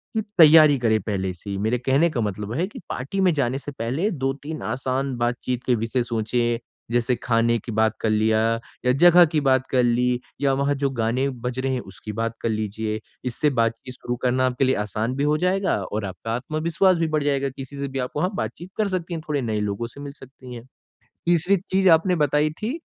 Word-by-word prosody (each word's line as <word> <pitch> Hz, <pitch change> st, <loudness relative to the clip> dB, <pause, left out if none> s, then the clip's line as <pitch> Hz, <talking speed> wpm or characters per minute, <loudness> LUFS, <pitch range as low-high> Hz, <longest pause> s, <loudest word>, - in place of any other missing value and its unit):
कि 220 Hz, -, +2 dB, 0.2 s
तैयारी 155 Hz, -2 st, +8 dB
करें 110 Hz, -2 st, +2 dB
पहले 95 Hz, -2 st, -2 dB
से 95 Hz, +3 st, -11 dB
ही, 100 Hz, -, -3 dB
मेरे 110 Hz, +5 st, 0 dB
कहने 135 Hz, +7 st, +2 dB
का 120 Hz, -, -1 dB
मतलब 105 Hz, 0 st, -3 dB
है 165 Hz, +8 st, 0 dB
कि 210 Hz, -, -10 dB
पार्टी 140 Hz, +11 st, -4 dB
में 180 Hz, -3 st, +4 dB
जाने 135 Hz, -3 st, 0 dB
से 145 Hz, -, -7 dB
पहले 135 Hz, -, -1 dB
2-3 145 Hz, +1 st, -4 dB
आसान 130 Hz, +3 st, -2 dB
बातचीत 120 Hz, +1 st, -2 dB
के 125 Hz, -, +3 dB
विषय 115 Hz, +3 st, -1 dB
सोचे 120 Hz, 0 st, -1 dB, 0.3 s
जैसे 120 Hz, +1 st, +1 dB
खाने 115 Hz, -1 st, +2 dB
की 115 Hz, -, -8 dB
बात 110 Hz, +1 st, +1 dB
कर 110 Hz, -, +1 dB
लिया 110 Hz, +1 st, +2 dB, 0.5 s
या 125 Hz, -, +4 dB
जगह 175 Hz, 0 st, +8 dB
की 150 Hz, -, +2 dB
बात 130 Hz, -2 st, +2 dB
कर 125 Hz, -2 st, +3 dB
ली 125 Hz, +1 st, +2 dB, 0.2 s
या 140 Hz, -1 st, +3 dB
वहाँ 140 Hz, +1 st, +1 dB
जो 140 Hz, -, +3 dB
गाने 120 Hz, +5 st, +1 dB, 0.2 s
बज 125 Hz, +1 st, -2 dB
रहे 135 Hz, 0 st, -1 dB
हैं 130 Hz, -, -1 dB
उसकी 95 Hz, +2 st, -9 dB
बात 115 Hz, +1 st, -2 dB
कर 115 Hz, -, 0 dB
लीजिए। 110 Hz, 0 st, -2 dB, 0.3 s
इससे 125 Hz, +4 st, +1 dB
बातचीत 115 Hz, +3 st, -2 dB
शुरू 120 Hz, -, -4 dB
करना 130 Hz, +1 st, +2 dB
आपके 130 Hz, +1 st, +1 dB
लिए 130 Hz, -, +2 dB
आसान 110 Hz, +4 st, -2 dB
भी 140 Hz, -, -1 dB
हो 150 Hz, +1 st, +2 dB
जाएगा 185 Hz, +3 st, +1 dB
और 105 Hz, +2 st, -4 dB
आपका 95 Hz, +4 st, -6 dB
आत्मविश्वास 160 Hz, +7 st, +1 dB
भी 165 Hz, -1 st, 0 dB
बढ़ 150 Hz, -, +1 dB
जाएगा 140 Hz, -1 st, 0 dB
किसी 135 Hz, +1 st, -9 dB
से 140 Hz, -, -2 dB
भी 135 Hz, 0 st, -4 dB
आप 125 Hz, 0 st, -3 dB
वहाँ 180 Hz, +6 st, 0 dB
बातचीत 175 Hz, -2 st, -5 dB
कर 215 Hz, -2 st, +1 dB
सकती 180 Hz, -2 st, -3 dB
हैं, 165 Hz, -, -4 dB
थोड़े 145 Hz, -2 st, 0 dB
नए 110 Hz, -3 st, -1 dB
लोगों 105 Hz, +3 st, -2 dB
से 140 Hz, -, -14 dB
मिल 140 Hz, -1 st, -7 dB
सकती 130 Hz, -1 st, -12 dB
है। 115 Hz, -, -9 dB, 0.6 s
तीसरी 175 Hz, +3 st, +3 dB
चीज 190 Hz, 0 st, +4 dB
आपने 180 Hz, +2 st, 0 dB
बताई 150 Hz, +2 st, +2 dB
थी, 220 Hz, -, -4 dB
130 Hz, 215 wpm, -23 LUFS, 115-150 Hz, 0.6 s, तैयारी